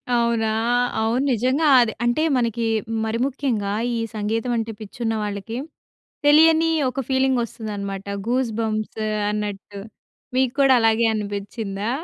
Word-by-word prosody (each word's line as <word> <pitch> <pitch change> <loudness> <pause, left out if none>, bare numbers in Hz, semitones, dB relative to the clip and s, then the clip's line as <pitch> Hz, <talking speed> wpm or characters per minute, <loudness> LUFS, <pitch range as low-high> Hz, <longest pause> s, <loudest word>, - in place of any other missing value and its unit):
అవునా! 235 -1 +1 0.5
అవును. 230 +4 +1
నిజంగా 255 +7 +1
అది 230 -3 +2
అంటే 240 +5 +1
మనకి 235 -2 0 0.4
మరి 220 +1 -1
ముఖ్యంగా 250 -7 -2 0.2
ఈ - - -1 0.2
సంగీతం 225 +3 -1
అంటే 225 0 -2
పిచ్చున్న 225 +2 -3
వాళ్ళకి 205 +3 -5 0.7
తెలియని 320 +2 +6 0.2
ఒక 260 +2 -3
ఫీలింగ్ 265 -1 +2
ఒస్తదనమాట 200 -4 -6 0.2
గూస్ 245 -1 +1
బంప్స్ 215 0 -2 0.3
అన్నట్టు. 205 -1 -5 0.6
మీకు 260 -1 +2
కూడా 270 -1 +6
అలాగే 225 +1 +3
అనిపించిందా? 205 0 -4
225 Hz, 120 wpm, -22 LUFS, 210-255 Hz, 0.7 s, తెలియని